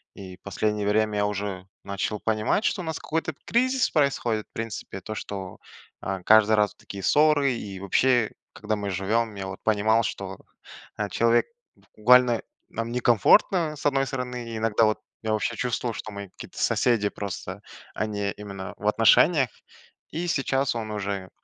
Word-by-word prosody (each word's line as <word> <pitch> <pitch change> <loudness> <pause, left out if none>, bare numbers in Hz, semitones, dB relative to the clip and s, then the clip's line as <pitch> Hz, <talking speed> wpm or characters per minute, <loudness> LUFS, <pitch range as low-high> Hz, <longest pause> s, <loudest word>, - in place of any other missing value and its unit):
И 95 -2 -10
последнее 105 +2 -2
время 105 0 +2
я 105 - +2
уже 100 -2 -4 0.2
начал 100 +2 -3
понимать, 110 - 0
что 190 - 0
у - - -6
нас 160 -1 -3
какой-то 160 0 -2
кризис 255 +2 +2
происходит, 120 -7 +1
в - - -53
принципе. 115 -3 -5
То, 110 - -6
что, 95 -2 -6 0.4
э, 95 -1 -3
каждый 110 0 +6
раз 105 0 +2
такие 100 -1 -9
ссоры. 150 0 +4
И 100 -5 -6
вообще, 115 +4 +2 0.2
когда 110 +1 -2
мы 100 -1 -4
живем, 105 +4 0
я, 100 -1 -5
вот, 95 0 -7
понимал, 110 +1 +3
что, 95 -3 -4 0.6
э, 105 - -1
человек, 115 +2 +3 0.5
буквально, 125 +1 +5 0.3
нам 115 +1 -4
некомфортно, 150 - +4
с - - -10
одной 135 -2 +2
стороны, 125 -4 -4
иногда, 115 0 +2
вот, 110 0 +1 0.2
я 110 -1 0
вообще 110 - -1
чувствовал, 120 -1 -2
что 110 - -7
мы 100 -1 -7
какие-то - - -12
соседи 115 -4 +2
просто, 100 -1 -6 0.3
а - - -1
не 100 -1 -2
именно 100 -2 -7
в 105 - -4
отношениях, 125 +6 +5 0.6
и 165 +3 -3
сейчас 135 -4 0
он 110 -2 -4
уже, 100 -2 -3
110 Hz, 160 wpm, -26 LUFS, 100-125 Hz, 0.6 s, каждый